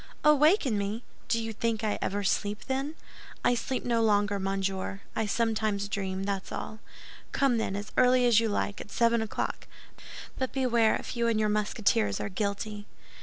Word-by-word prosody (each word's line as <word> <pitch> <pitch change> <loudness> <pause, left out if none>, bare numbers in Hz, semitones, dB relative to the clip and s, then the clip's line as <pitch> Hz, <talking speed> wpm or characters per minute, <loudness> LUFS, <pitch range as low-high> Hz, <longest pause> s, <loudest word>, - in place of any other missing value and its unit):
"Awaken 300 - +4
me! 205 +4 -3 0.2
Do 230 - +1
you 225 0 -4
think 230 -1 -1
I 210 -1 0
ever 205 +1 -1
sleep, 205 +1 -1
then? 270 +4 -2 0.5
I - - +5
sleep 255 +2 -2
no 235 -1 +2
longer, 205 -2 +2
monsieur. 195 0 -2
I 220 - 0
sometimes 215 -2 0
dream, 195 -2 -3
that's 195 -1 -3
all. 215 - -5 0.5
Come, 265 -4 +2
then, 195 -3 -1
as 205 +1 -5
early 250 0 +5
as 235 -2 +6
you 225 -1 +1
like—at 205 0 -2
seven 235 +1 +2
o'clock; 220 - -3 0.7
but 260 -1 -2
beware, 240 -4 +3
if - - -6
you 235 -1 +1
and 225 -2 +2
your 215 -1 +2
Musketeers 205 - +1
are - - -3
guilty." 205 +1 -3
215 Hz, 170 wpm, -29 LUFS, 200-235 Hz, 0.7 s, as